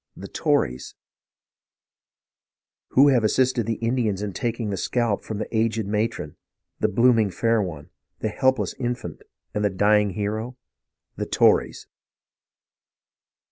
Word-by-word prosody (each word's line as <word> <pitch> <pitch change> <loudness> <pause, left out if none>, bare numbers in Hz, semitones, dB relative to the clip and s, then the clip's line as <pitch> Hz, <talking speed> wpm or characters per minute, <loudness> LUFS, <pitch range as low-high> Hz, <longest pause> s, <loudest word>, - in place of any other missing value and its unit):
'' - - -52
The - - -9
Tories! 60 +1 -1 1.9
Who 140 +2 +5
have 125 -4 +3
assisted 125 +1 +1
the 115 - 0
Indians 115 -5 0
in 100 -2 -4
taking 115 -1 -2
the - - -1
scalp 115 +2 -1
from 110 - -5
the 110 - -5
aged 110 -1 +1
matron, 105 -7 -2 0.4
the - - +2
blooming 115 -1 +3
fair 115 +3 +1
one, 80 -7 -6 0.3
the 110 - -2
helpless 120 -2 +1
infant, 120 -1 -4 0.3
and 105 - -1
the 105 - +3
dying 105 +1 +2
hero? 110 +4 -3 0.6
The - - -3
Tories - - +2
110 Hz, 130 wpm, -24 LUFS, 105-120 Hz, 1.9 s, Who